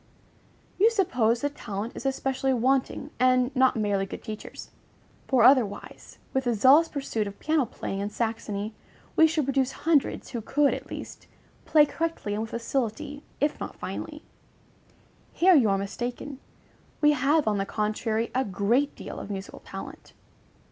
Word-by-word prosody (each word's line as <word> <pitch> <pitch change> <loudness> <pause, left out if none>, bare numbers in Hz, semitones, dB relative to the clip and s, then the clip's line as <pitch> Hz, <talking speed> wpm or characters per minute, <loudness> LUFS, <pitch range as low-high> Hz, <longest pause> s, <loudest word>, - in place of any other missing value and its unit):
You 430 +4 +6
suppose 255 - +1
that 285 0 -2
talent 210 +2 -5
is - - -3
especially 270 0 0
wanting, 260 +4 0
and 255 +1 +3
not 260 0 +4
merely 205 -3 0
good - - -8
teachers; 215 -1 -8 0.6
for 255 -4 +3
otherwise, 245 -5 +2 0.2
with 265 0 0
the 240 -1 +1
zealous 270 +9 +6
pursuit 270 -8 -3
of 200 - -8
piano 310 -5 +1
playing 195 - -5
in 200 +1 -2
Saxony, 215 -1 -3 0.4
we 320 - +7
should 310 -3 0
produce 270 -1 +1
hundreds 320 -4 +1
who 235 -3 -3
could, 285 +6 +2
at - - -7
least, - - -8 0.4
play 300 -2 +6
correctly 325 -9 -3
and 210 - -2
with 225 - -4
facility, 270 +5 -3 0.2
if 295 +1 0
not - - -6
finely. - - -6 1.1
Here 370 +2 +5
you 255 -10 +5
are 195 - +2
mistaken: 245 +7 -5 0.6
we 295 0 +5
have, 290 +1 +2
on 210 -2 +1
the 195 - 0
contrary, 220 +1 -1
a 260 - +1
great 230 +7 +1
deal - - -7
of - - -8
musical 195 -1 -6
talent. - - -10
255 Hz, 155 wpm, -27 LUFS, 215-285 Hz, 1.1 s, we